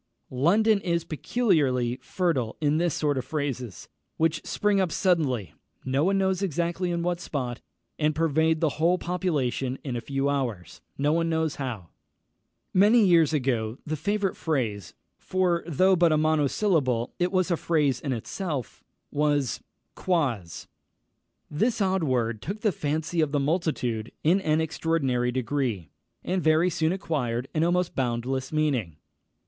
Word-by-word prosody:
London 200 - +3
is 170 -3 0
peculiarly 145 - +1
fertile 140 -9 -1
in 150 0 +2
this 170 -1 +1
sort 145 -3 0
of - - -4
phrases, 130 - -4 0.3
which 160 0 +1
spring 205 -1 +1
up 180 -3 0
suddenly, 140 - 0 0.3
no 135 +2 +1
one 195 +3 +2
knows 190 -1 +1
exactly 175 0 -1
in 170 -1 -1
what 175 0 -1
spot, 125 -7 -4 0.4
and 155 0 +1
pervade 160 0 +2
the 160 -4 +1
whole 175 +2 +4
population 145 -8 -1
in 130 -4 -4
a 120 - -3
few 135 +1 -1
hours, 120 - -3 0.2
no 145 +2 +2
one 165 0 +1
knows 160 -2 0
how. 115 -11 -5 0.8
Many 210 +4 +5
years 165 -5 +5
ago 125 -6 -1
the 155 - -2
favourite 200 +5 -1
phrase 110 - -2 0.2
(for, 180 -2 0
though 185 +4 +3
but 170 -2 +4
a 155 - +3
monosyllable, 150 - +1
it 180 0 +1
was 185 -1 +1
a - - +4
phrase 150 -6 +1
in 140 - -3
itself) 135 - -4 0.3
was 145 -4 0 0.3
Quoz. 130 - -1 0.8
This 225 +11 0
odd 190 -3 +1
word 120 -6 0
took 205 +5 -5
the 215 - +2
fancy 160 +2 -1
of 155 -3 0
the 145 - +2
multitude 140 -8 -1
in 180 +6 +3
an 155 -2 +1
extraordinary 140 -6 0
degree, 125 - -2 0.3
and 185 0 -1
very 160 +3 +3
soon 160 0 +1
acquired 135 -10 -2
an 155 - +1
almost 175 +1 +1
boundless 130 +1 -2
meaning. 140 - 0
155 Hz, 150 wpm, -26 LUFS, 130-175 Hz, 0.8 s, Many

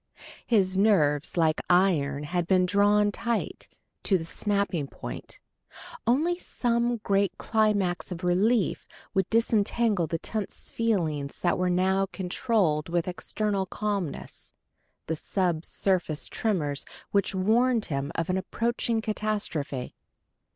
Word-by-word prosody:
His 190 -5 +2
nerves, 155 -8 +3
like 160 -2 +2
iron, 160 -6 +3
had 175 +2 -1
been 185 -1 +4
drawn 205 +2 +3
tight 230 +2 -3 0.3
to 195 - +2
the 165 - -6
snapping 200 -5 -1
point: - - -8 0.7
only 320 +9 +2
some 240 -5 0
great 195 -1 +1
climax 205 -5 +1
of 180 0 -6
relief 195 +5 +2 0.3
would 190 -3 +1
disentangle 220 -4 +2
the 165 - -2
tense 210 +4 -5
feelings 160 -11 -1
which 175 - +3
he 180 - +2
now 190 +2 +2
controlled 180 -5 0
with 170 0 0
external 195 +2 -2
calmness, 200 -5 -3 0.5
and 160 - -1
sub 175 -5 0
surface 175 -7 0
tremors 155 -10 -1 0.3
which 200 -1 +1
warned 225 +4 +3
him 140 -1 -3
of 165 - -1
an 185 - +1
approaching 230 +3 -1
catastrophe. 210 - -2
190 Hz, 120 wpm, -27 LUFS, 170-215 Hz, 0.7 s, been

